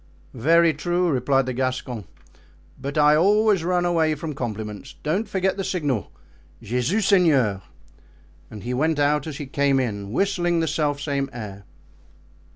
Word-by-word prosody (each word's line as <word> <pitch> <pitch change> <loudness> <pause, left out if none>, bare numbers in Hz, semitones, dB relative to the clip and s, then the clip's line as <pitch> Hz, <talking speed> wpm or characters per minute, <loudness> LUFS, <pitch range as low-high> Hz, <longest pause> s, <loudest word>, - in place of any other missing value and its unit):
"Very 165 +6 +4
true," 175 +4 0
replied 135 0 +2
the 130 - -3
Gascon, 125 -4 -3 0.8
"but 140 +3 -4
I 150 0 +5
always 205 +2 +3
run 175 0 +1
away 160 -3 +2
from 155 +1 -5
compliments. 110 0 -6
Don't 185 +9 -1
forget 190 0 0
the 195 - -2
signal: 145 - -2 0.5
'Jesus 125 - -1
Seigneur!'" 140 - +3 0.9
and 105 -2 -10
he 125 +2 -3
went 155 +4 +1
out 145 +1 +1
as 150 -3 -6
he 145 - -5
came 140 0 +1
in, 100 -5 -3
whistling 175 - +1
the 165 - 0
self 150 -2 0
same 140 -1 -2
air. 100 -4 -8
145 Hz, 150 wpm, -23 LUFS, 125-170 Hz, 0.9 s, I